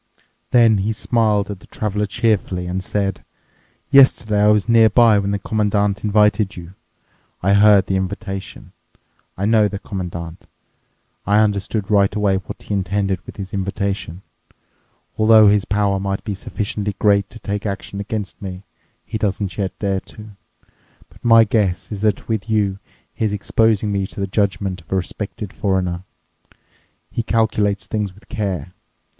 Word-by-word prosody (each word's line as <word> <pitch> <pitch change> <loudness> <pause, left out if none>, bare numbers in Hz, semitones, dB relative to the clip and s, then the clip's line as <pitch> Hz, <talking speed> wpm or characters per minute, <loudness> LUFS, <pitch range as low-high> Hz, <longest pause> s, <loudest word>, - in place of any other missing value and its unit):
Then 115 -4 +5
he 105 +3 -1
smiled 105 -3 +1
at 100 - -7
the - - -18
Traveler 105 -1 -2
cheerfully 100 -5 0
and 90 +1 -3
said, 95 -1 -2 0.7
"Yesterday 120 -6 +5
I 105 - +5
was 105 0 +3
nearby 115 -1 +5
when 100 0 -2
the 100 - 0
Commandant 105 0 0
invited 105 -1 +2
you. 85 +1 -10 0.7
I 100 +2 +3
heard 100 -1 +6
the 95 - 0
invitation. 95 +1 -5 0.7
I 95 - -1
know 110 -1 +4
the 100 0 -5
Commandant. 85 -4 -7 0.8
I 100 +1 +3
understood 105 0 0
right 100 -1 +3
away 100 -2 +2
what 95 -4 -8
he - - -5
intended 95 -1 -1
with - - -10
his 95 -2 -7
invitation. 95 -2 -3 1.0
Although 110 -1 +7
his 105 -1 +2
power 100 -1 +1
might 95 0 -3
be 105 - -3
sufficiently 105 0 -4
great 100 -1 +2
to 115 - -12
take 100 -1 -4
action 100 0 -5
against 105 0 -5
me, 95 -1 -7 0.4
he 110 0 -4
doesn't 100 -2 -2
yet 95 -2 -3
dare 100 -2 -1
to. 105 +2 -13 0.8
But - - -21
my 115 -1 +7
guess 105 -4 0
is 105 - -4
that 105 -1 0
with 110 -1 -2
you 100 -3 +1 0.3
he - - -4
is 105 - -1
exposing 105 +1 +1
me 100 -1 -1
to - - -11
the 100 - 0
judgment 95 -2 -1
of 80 - -25
a - - +1
respected 100 +2 -4
foreigner. 95 -2 -1 1.1
He - - -1
calculates 110 -3 0
things 105 -4 -3
with 105 - -20
care. 95 - -3
100 Hz, 155 wpm, -20 LUFS, 95-105 Hz, 1.1 s, Although